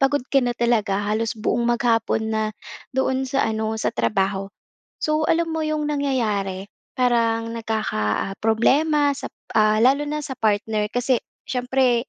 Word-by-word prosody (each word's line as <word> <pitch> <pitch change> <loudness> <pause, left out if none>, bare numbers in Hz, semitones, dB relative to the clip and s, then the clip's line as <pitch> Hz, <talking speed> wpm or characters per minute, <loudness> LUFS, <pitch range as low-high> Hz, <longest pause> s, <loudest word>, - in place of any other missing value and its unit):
pagod 270 -1 +2
ka 275 - +5
na 245 -2 -1
talaga 215 -4 +1
halos 220 +3 -1
buong 235 +2 0
maghapon 225 -2 +1
na 220 0 +1 0.5
doon 265 0 0
sa 275 0 +1
ano, 220 0 -1
sa - - -1
trabaho. 195 - 0 0.5
So, 310 0 +1
alam 330 0 +1
mo 320 - -1
yung 310 -1 -1
nangyayari, 210 -9 -1 0.3
parang 230 -2 +1
nagkaka, 220 - -2 0.3
ah, - - -7
problema 285 +7 +3
sa, - - -6 0.3
ah 215 0 +4
lalo 275 +4 +4
na 300 0 -2
sa 270 - -5
partner. 210 0 0
Kasi 245 0 +1 0.3
siyempre 250 -1 +1
235 Hz, 150 wpm, -22 LUFS, 215-270 Hz, 0.5 s, ka